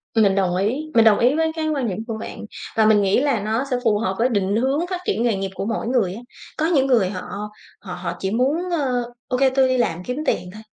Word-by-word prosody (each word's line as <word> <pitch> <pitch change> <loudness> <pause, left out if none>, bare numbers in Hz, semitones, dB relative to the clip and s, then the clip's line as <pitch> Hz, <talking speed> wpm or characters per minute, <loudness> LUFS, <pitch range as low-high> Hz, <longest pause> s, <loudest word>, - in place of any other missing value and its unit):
Mình 205 -4 +4
đồng 185 -3 +1
ý, 255 +12 -1
mình 230 -1 +5
đồng 215 -2 +5
ý 245 +3 +4
với 320 0 +1
cái 315 -1 -2
quan 280 -5 -1
điểm 185 -4 -3
của 225 -2 -4
bạn, 220 - -7 0.3
và 220 - +4
mình 215 -1 +5
nghĩ 195 +2 +3
là 280 -6 +1
nó 220 +4 -1
sẽ 250 - +2
phù 220 -4 +3
hợp 190 -4 -1
với 245 +3 +3
định 200 -3 0
hướng 270 +9 +1
phát 365 -1 -3
triển 230 - 0
nghề 235 -3 +2
nghiệp 195 0 -3
của 195 - -3
mỗi 225 +1 -2
người 230 -8 +1
á. 220 - -8 0.4
Có 310 - +1
những 290 -6 +2
người 230 -8 +3
họ 185 -2 -5 0.6
họ 185 -3 -7
họ 175 -1 -4
chỉ 190 - -2
muốn, 280 - 0
ơ: 250 -7 -1 0.2
"Ô 250 - -1
kê, 270 +1 +4
tôi 260 0 +3
đi 255 0 +1
làm 180 -8 -1
kiếm 250 +6 -4
tiền 180 - -1
thôi, 215 +1 -11
230 Hz, 270 wpm, -21 LUFS, 200-265 Hz, 0.6 s, mình